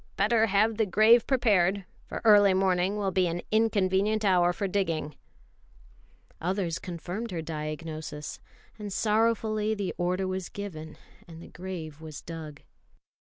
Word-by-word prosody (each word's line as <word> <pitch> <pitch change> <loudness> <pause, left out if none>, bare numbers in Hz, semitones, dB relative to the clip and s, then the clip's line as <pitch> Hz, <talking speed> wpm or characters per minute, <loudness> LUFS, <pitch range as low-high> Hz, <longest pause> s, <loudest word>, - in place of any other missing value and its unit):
Better 220 +2 +3
have 210 +2 +2
the 220 -2 +1
grave 215 +5 +5
prepared, 200 -7 +2 0.2
for - - -6
early 205 -3 +6
morning 190 +1 +1
will 200 -2 -1
be 185 -1 +2
an 170 +1 -3
inconvenient 215 -1 +2
hour 180 -2 +4
for 195 +3 -3
digging." 165 -6 -2 1.3
Others 180 -1 -1
confirmed 180 +6 -6
her 170 -3 -4
diagnosis, 155 -1 -6 0.4
and 205 -1 -6
sorrowfully 215 0 +1
the 200 -3 -3
order 180 +2 0
was 185 -1 -4
given 160 -6 -8 0.3
and 165 -1 -11
the - - -12
grave 165 -5 -7
was 155 -3 -8
dug. 155 -3 -8
190 Hz, 135 wpm, -28 LUFS, 165-210 Hz, 1.3 s, early